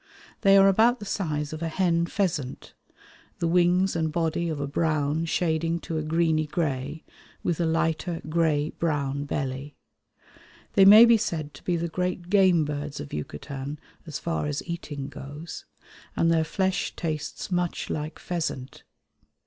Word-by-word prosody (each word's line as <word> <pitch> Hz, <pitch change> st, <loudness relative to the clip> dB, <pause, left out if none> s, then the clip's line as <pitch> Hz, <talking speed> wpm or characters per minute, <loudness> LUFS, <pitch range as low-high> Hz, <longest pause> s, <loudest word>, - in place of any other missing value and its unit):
They 195 Hz, -2 st, +6 dB
are 195 Hz, 0 st, +7 dB
about 225 Hz, +6 st, +4 dB
the 205 Hz, -, -9 dB
size 155 Hz, -7 st, -2 dB
of 155 Hz, -, -6 dB
a 165 Hz, -, -1 dB
hen 170 Hz, -1 st, +1 dB
pheasant, 165 Hz, -10 st, -2 dB, 0.6 s
the 170 Hz, -, 0 dB
wings 180 Hz, +2 st, +3 dB
and 160 Hz, -1 st, 0 dB
body 165 Hz, +1 st, 0 dB
of 155 Hz, -3 st, -3 dB
a 140 Hz, -, -1 dB
brown 155 Hz, +1 st, 0 dB
shading 165 Hz, 0 st, 0 dB
to 160 Hz, -1 st, -3 dB
a -, -, -1 dB
greeny 155 Hz, 0 st, +1 dB
grey 145 Hz, -1 st, -2 dB, 0.4 s
with 170 Hz, -, -1 dB
a 170 Hz, -, +2 dB
lighter 165 Hz, +1 st, 0 dB
grey 155 Hz, -2 st, +1 dB
brown 145 Hz, -3 st, -1 dB
belly. 140 Hz, 0 st, -4 dB, 1.0 s
They 195 Hz, -, +6 dB
may 215 Hz, +4 st, +10 dB
be 230 Hz, -1 st, +6 dB
said 155 Hz, -7 st, -3 dB
to -, -, -14 dB
be 175 Hz, -, 0 dB
the 170 Hz, +1 st, -2 dB
great 180 Hz, +1 st, -3 dB
game 185 Hz, -6 st, +5 dB
birds 145 Hz, 0 st, -4 dB
of 70 Hz, -, -8 dB
Yucatan 140 Hz, -, -5 dB, 0.3 s
as 150 Hz, -, -4 dB
far 165 Hz, -3 st, -2 dB
as 145 Hz, 0 st, -3 dB
eating 150 Hz, -5 st, -5 dB
goes, 145 Hz, +3 st, -8 dB, 0.5 s
and 165 Hz, -, +3 dB
their 160 Hz, -1 st, +3 dB
flesh 190 Hz, +3 st, -1 dB
tastes 155 Hz, +1 st, -4 dB
much 175 Hz, -1 st, -1 dB
like 155 Hz, +1 st, -4 dB
pheasant. 155 Hz, -7 st, -4 dB
160 Hz, 155 wpm, -26 LUFS, 150-175 Hz, 1.0 s, may